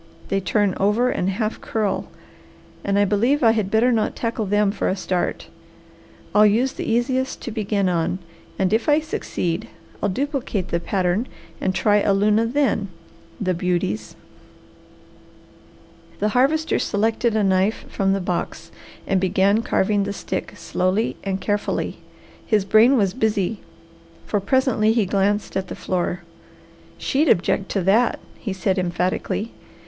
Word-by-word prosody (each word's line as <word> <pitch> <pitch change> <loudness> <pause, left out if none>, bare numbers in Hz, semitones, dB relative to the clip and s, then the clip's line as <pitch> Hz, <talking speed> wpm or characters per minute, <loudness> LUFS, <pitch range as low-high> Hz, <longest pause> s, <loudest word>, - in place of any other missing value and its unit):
They 195 - +1
turn 200 0 +1
over 220 +6 +2
and 180 - -1
half 215 +3 -2
curl 215 -3 -1 0.8
and 200 0 0
I 205 - +4
believe 235 +8 +2
I 225 - +7
had 215 -4 0
better 225 +4 +3
not 225 -3 0
tackle 230 -3 -2
them 205 0 +2
for - - -1
a 185 - 0
start. 185 -2 -2 0.9
I'll 210 - +6
use 240 +6 +2
the - - -3
easiest 260 +3 0
to 235 - -4
begin 210 -3 0
on, 175 0 0 0.4
and 190 +1 +1
if 225 +6 +1
I 295 +1 +5
succeed 180 - -3 0.3
I'll 205 - +1
duplicate 255 - -2
the 170 - 0
pattern 185 +5 0 0.3
and 190 0 0
try 210 -1 +3
a 200 -1 +2
luna 210 +3 +3
then. 240 -5 +1 0.5
The 185 -4 0
beauties!" 170 - -2 2.0
The 210 - 0
Harvester 280 +8 +2
selected 225 +2 0
a 215 - +2
knife 190 +2 +1
from 195 -1 0
the 195 - 0
box 170 -2 -4 0.3
and 190 -1 +1
began 195 +3 +3
carving 200 -2 +1
the 200 - -3
stick - - -4
slowly 185 +5 0
and 195 -1 -2
carefully. 205 +2 -2 0.4
His 210 -3 +1
brain 220 +6 +5
was 195 -4 +2
busy, 215 -3 0 0.7
for 205 - 0
presently 225 0 +2
he 225 -3 +2
glanced 200 +2 0
at 190 -1 -1
the - - -6
floor. 180 -1 -2 0.7
"She'd 290 +2 +1
object 185 +2 +2
to 195 - +1
that!" 220 +6 +3 0.2
he 210 - -4
said 190 0 0
emphatically. 185 +5 -1
205 Hz, 150 wpm, -22 LUFS, 190-225 Hz, 2.0 s, I